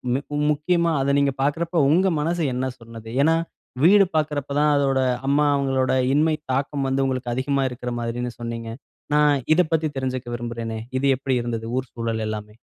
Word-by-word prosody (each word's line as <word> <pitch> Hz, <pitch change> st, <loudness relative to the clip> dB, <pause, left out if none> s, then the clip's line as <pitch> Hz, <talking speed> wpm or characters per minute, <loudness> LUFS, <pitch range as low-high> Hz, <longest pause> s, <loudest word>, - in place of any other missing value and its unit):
மிக் 145 Hz, +2 st, -4 dB, 0.2 s
முக்கியமா 170 Hz, +3 st, +1 dB
அத 140 Hz, +1 st, +1 dB
நீங்க 140 Hz, -1 st, +2 dB
பார்க்கிறப்போ 165 Hz, +4 st, 0 dB
உங்க 185 Hz, +5 st, +4 dB
மனசு 165 Hz, +2 st, -1 dB
என்ன 130 Hz, +1 st, -1 dB
சொன்னது? 115 Hz, -1 st, -11 dB
ஏன்னா 160 Hz, +1 st, +4 dB, 0.5 s
வீடு 195 Hz, +3 st, +7 dB
பாக்கிறப்போ 145 Hz, -2 st, -1 dB
தான் 150 Hz, 0 st, +4 dB
அதோட 135 Hz, -1 st, +2 dB, 0.3 s
அம்மா 145 Hz, +1 st, +3 dB
அவங்களோட 135 Hz, -2 st, +1 dB, 0.2 s
இன்மை 155 Hz, +2 st, +3 dB, 0.2 s
தாக்கம் 135 Hz, 0 st, -1 dB
வந்து 135 Hz, +1 st, +1 dB
உங்களுக்கு 130 Hz, -2 st, -2 dB
அதிகமா 135 Hz, +2 st, 0 dB
இருக்கற 125 Hz, 0 st, -5 dB
மாரின்னு 120 Hz, +1 st, -3 dB
சொன்னீங்க. 115 Hz, -1 st, -5 dB, 0.5 s
நான் 145 Hz, -3 st, +3 dB
இதை 180 Hz, -1 st, +4 dB
பத்தி 160 Hz, -1 st, +2 dB
தெரிஞ்சுக்க 130 Hz, -2 st, -3 dB
விரும்புறேனே. 115 Hz, -1 st, -5 dB, 0.2 s
இது 140 Hz, -, -1 dB
எப்படி 135 Hz, -1 st, -1 dB
இருந்தது? 115 Hz, -1 st, -4 dB
ஊர் 130 Hz, -2 st, -3 dB
சூழல் 115 Hz, -1 st, -2 dB
எல்லாமே. 105 Hz, 0 st, -6 dB
135 Hz, 165 wpm, -23 LUFS, 120-150 Hz, 0.5 s, வீடு